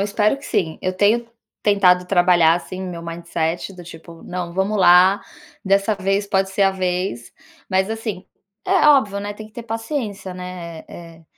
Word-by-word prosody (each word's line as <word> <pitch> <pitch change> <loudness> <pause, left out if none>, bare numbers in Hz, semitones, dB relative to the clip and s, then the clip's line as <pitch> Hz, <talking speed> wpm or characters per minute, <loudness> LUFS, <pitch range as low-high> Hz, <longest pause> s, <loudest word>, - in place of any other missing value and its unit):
espero 210 +5 +1
que 280 - -14
sim. 180 - -1
Eu 185 - -1
tenho 220 +4 +2 0.4
tentado 180 -3 +4
trabalhar, 175 -3 +4
assim, 185 +2 -6
meu 175 -2 -6
mindset, 170 +1 -3
do 175 -1 -11
tipo: 165 0 -12
"Não, 175 -1 -5
vamos 195 +3 0
lá, 185 +2 +6 0.4
dessa 195 +2 +2
vez 195 +1 -1
pode 190 -1 0
ser 200 +1 0
a 195 - +4
vez", 180 -9 -3 0.4
mas 190 +1 +1
assim, 220 -4 -5 0.4
é 375 -5 +4
óbvio, 215 -9 +3
né, 205 0 -4
tem 215 0 -10
que 215 - -20
ter 235 +2 -8
paciência, 225 -4 -4
né, 180 -3 -8
eh 165 -1 -11
eh, 165 - -22
190 Hz, 175 wpm, -20 LUFS, 175-205 Hz, 0.4 s, lá